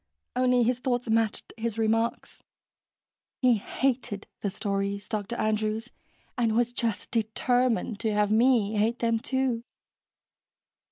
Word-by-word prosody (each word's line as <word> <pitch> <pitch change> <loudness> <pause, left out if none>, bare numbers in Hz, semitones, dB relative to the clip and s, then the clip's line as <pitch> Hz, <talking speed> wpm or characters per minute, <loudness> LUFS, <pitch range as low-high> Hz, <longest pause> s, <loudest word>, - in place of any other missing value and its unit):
Only 250 -1 +3
his 245 +1 +1
thoughts 245 -2 -1
matched 225 -1 0
his 225 -1 -3
remarks. 225 +1 0 1.0
He 250 -3 +4
hated 235 -2 -2 0.2
the 200 - 0
stories, 200 0 -2
Dr. 215 +2 -3
Andrews, 215 +1 -1 0.5
and 225 -2 +2
was 240 0 +2
just 230 -5 -2
determined 230 0 +1
to 220 - 0
have 210 0 +2
me 220 -2 +3
hate 225 +3 +2
them, 230 -2 +1
too. 260 -2 -1
225 Hz, 120 wpm, -27 LUFS, 215-245 Hz, 1.0 s, He